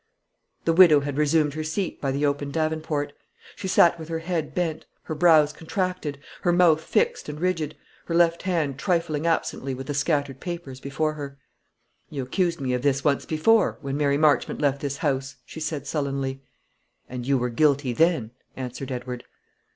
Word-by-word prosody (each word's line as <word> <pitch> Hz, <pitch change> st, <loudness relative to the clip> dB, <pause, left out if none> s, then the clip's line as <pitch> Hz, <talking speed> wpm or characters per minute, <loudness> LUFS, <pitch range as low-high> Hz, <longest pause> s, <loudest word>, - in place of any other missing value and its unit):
The 165 Hz, -, +3 dB
widow 165 Hz, -4 st, +7 dB
had 140 Hz, -1 st, -4 dB
resumed 150 Hz, -1 st, +2 dB
her 155 Hz, +1 st, -3 dB
seat 165 Hz, +4 st, -3 dB
by 135 Hz, -, 0 dB
the 140 Hz, +2 st, 0 dB
open 145 Hz, 0 st, -1 dB
davenport. 155 Hz, -1 st, -1 dB, 0.4 s
She 190 Hz, -, -5 dB
sat 170 Hz, -2 st, +5 dB
with 160 Hz, 0 st, -8 dB
her 165 Hz, -, -1 dB
head 165 Hz, -2 st, -3 dB
bent, 165 Hz, -3 st, -2 dB, 0.2 s
her -, -, -4 dB
brows 155 Hz, -2 st, +5 dB
contracted, 175 Hz, -2 st, -3 dB, 0.2 s
her 175 Hz, -, +2 dB
mouth 170 Hz, -3 st, +4 dB
fixed 475 Hz, -, 0 dB
and 150 Hz, 0 st, -6 dB
rigid, 165 Hz, -4 st, -1 dB, 0.3 s
her 165 Hz, -, -2 dB
left 170 Hz, 0 st, +3 dB
hand 160 Hz, -7 st, -1 dB
trifling 165 Hz, -3 st, 0 dB
absently 135 Hz, -5 st, -1 dB
with 135 Hz, +1 st, -7 dB
the 145 Hz, -, -3 dB
scattered 145 Hz, -2 st, 0 dB
papers 170 Hz, -7 st, -6 dB
before 155 Hz, +3 st, -1 dB
her. 140 Hz, -2 st, -7 dB, 0.7 s
"You 140 Hz, -3 st, -4 dB
accused 170 Hz, +6 st, 0 dB
me 130 Hz, -2 st, -1 dB
of 125 Hz, -, 0 dB
this 135 Hz, 0 st, +1 dB
once 145 Hz, -3 st, +1 dB
before, 200 Hz, +7 st, +3 dB
when 135 Hz, -1 st, -3 dB
Mary 140 Hz, -1 st, +2 dB
Marchmont 150 Hz, -1 st, +2 dB
left 140 Hz, -1 st, +1 dB
this 140 Hz, -1 st, -3 dB
house," 140 Hz, -3 st, -1 dB
she 160 Hz, -, -9 dB
said 155 Hz, -3 st, -3 dB
sullenly. 135 Hz, -3 st, -2 dB, 0.7 s
"And 125 Hz, 0 st, -6 dB
you 140 Hz, -1 st, +3 dB
were 125 Hz, 0 st, -1 dB
guilty 140 Hz, 0 st, +2 dB
then," 160 Hz, -6 st, +2 dB, 0.3 s
answered 130 Hz, +1 st, -5 dB
Edward. 125 Hz, -1 st, -5 dB
150 Hz, 175 wpm, -25 LUFS, 140-165 Hz, 0.7 s, widow